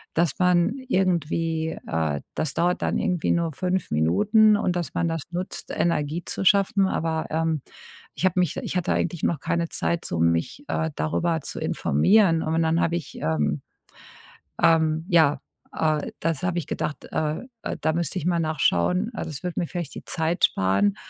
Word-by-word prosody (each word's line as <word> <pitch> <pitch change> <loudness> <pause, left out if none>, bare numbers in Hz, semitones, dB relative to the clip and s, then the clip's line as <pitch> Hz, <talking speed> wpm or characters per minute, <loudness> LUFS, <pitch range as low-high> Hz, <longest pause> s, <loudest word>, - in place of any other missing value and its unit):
dass 165 -3 +1
man 180 +4 +3
irgendwie, 165 -5 0
äh 80 -3 -1
das 155 -3 -1
dauert 175 +1 +1
dann - - 0
irgendwie 180 -3 0
nur 170 -2 0
5 185 +5 -1
Minuten 200 - +4
und 180 -3 0
dass 175 -2 -3
man 170 - 0
das 165 -1 -2
nutzt, 180 +2 -5
Energie 165 0 0
zu - - -4
schaffen. 195 0 +4
Aber, 160 -3 -1
ähm, 160 -2 0 0.5
ich - - -1
habe 185 0 +2
mich 175 -5 +1
ich - - -4
hatte 180 - 0
eigentlich 170 -1 -2
noch 165 - +1
keine 170 +3 -1
Zeit, 170 0 -1
so 85 - -3
mich, 85 - 0
äh, 160 0 -1
darüber 165 +1 0
zu - - -7
informieren. 165 - +3
Und 160 +1 0
dann 160 +1 +2
habe 170 - +1
ich, 160 - -8
ähm, 75 -2 0 1.0
ähm 160 0 +3
ja, 160 -6 +4 0.4
äh, 155 -2 0
das 165 -2 -1
habe 175 -1 0
ich 160 - -4
gedacht, 155 -2 -3
äh, 155 0 -1 0.2
äh, - - -3
da 160 - +1
müsste 170 +1 -2
ich 160 - -4
mal 175 -1 +2
nachschauen. 160 - +1
Also, - - -4
das 145 - -7
würde 180 -1 -3
mir 170 - -1
vielleicht 170 -5 -5
die - - -8
Zeit 165 +1 0
sparen. 100 +1 +1
165 Hz, 180 wpm, -24 LUFS, 150-175 Hz, 1.0 s, Minuten